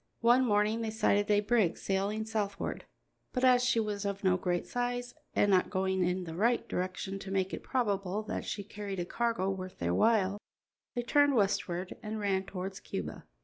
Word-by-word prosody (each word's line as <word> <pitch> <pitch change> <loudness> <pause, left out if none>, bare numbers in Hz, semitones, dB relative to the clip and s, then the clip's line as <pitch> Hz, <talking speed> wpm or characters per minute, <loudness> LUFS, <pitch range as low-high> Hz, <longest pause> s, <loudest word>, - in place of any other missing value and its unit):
One 240 +2 +5
morning 215 0 +2
they 225 - -1
sighted 205 -1 +2
a 205 0 +4
brig 210 -5 +2
sailing 200 +3 -1
southward, 210 -2 -3 0.5
but 255 - -1
as 250 -1 +6
she 250 -2 +3
was 210 -2 -2
of 200 0 -3
no 185 -1 +4
great 180 -1 -1
size 245 0 -2 0.2
and 205 - +4
not 185 -1 +4
going 190 -1 +1
in 180 +1 0
the 165 -2 -6
right 230 +7 +1
direction 185 +2 -3
to 195 - -8
make 190 0 0
it - - -4
probable 205 -5 -1
that - - -4
she 205 - -4
carried 200 -1 -6
a 175 - -1
cargo 225 -2 0
worth 185 -1 -6
their 85 0 -1
while, 205 - +3 0.6
they 240 - -1
turned 285 +2 +4
westward 190 -4 0
and 215 0 -4
ran 195 -2 0
towards 190 0 -5
Cuba. - - -6
205 Hz, 190 wpm, -31 LUFS, 190-225 Hz, 0.6 s, as